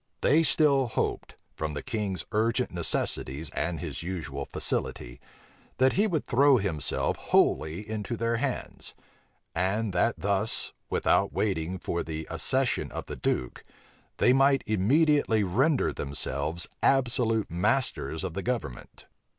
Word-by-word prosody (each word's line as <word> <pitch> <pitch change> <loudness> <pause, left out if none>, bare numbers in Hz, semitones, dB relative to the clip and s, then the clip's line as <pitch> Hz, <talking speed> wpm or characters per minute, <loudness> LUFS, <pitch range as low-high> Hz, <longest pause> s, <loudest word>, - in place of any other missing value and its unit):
They 155 +3 +4
still 145 -4 +3
hoped, 110 - -2 0.2
from 75 -1 -4
the 75 - -4
king's 100 -6 -3
urgent 115 +3 +1
necessities 80 -3 -2
and 85 -2 -2
his 75 -6 -5
usual 80 -6 -4
facility, - - -3 0.6
that 130 +1 +4
he 205 +3 +3
would 165 -7 -1
throw 135 +2 +5
himself 95 -9 -1
wholly 85 +7 +1
into 110 +1 -4
their 115 +1 0
hands; 130 0 -4 0.6
and 95 +4 0
that 90 +6 +2
thus, 100 +4 +1 0.2
without - - +2
waiting 95 -3 -1
for 85 -1 -3
the 80 0 -5
accession - - 0
of - - -5
the - - -6
duke, 60 - -2 0.5
they 125 - +4
might 135 +1 +4
immediately 115 - +3
render 130 - +2
themselves 70 +4 -2 0.2
absolute 120 -4 +2
masters 90 -2 0
of 95 -4 -3
the 95 - -3
government. 115 - -5
105 Hz, 130 wpm, -28 LUFS, 85-125 Hz, 0.6 s, throw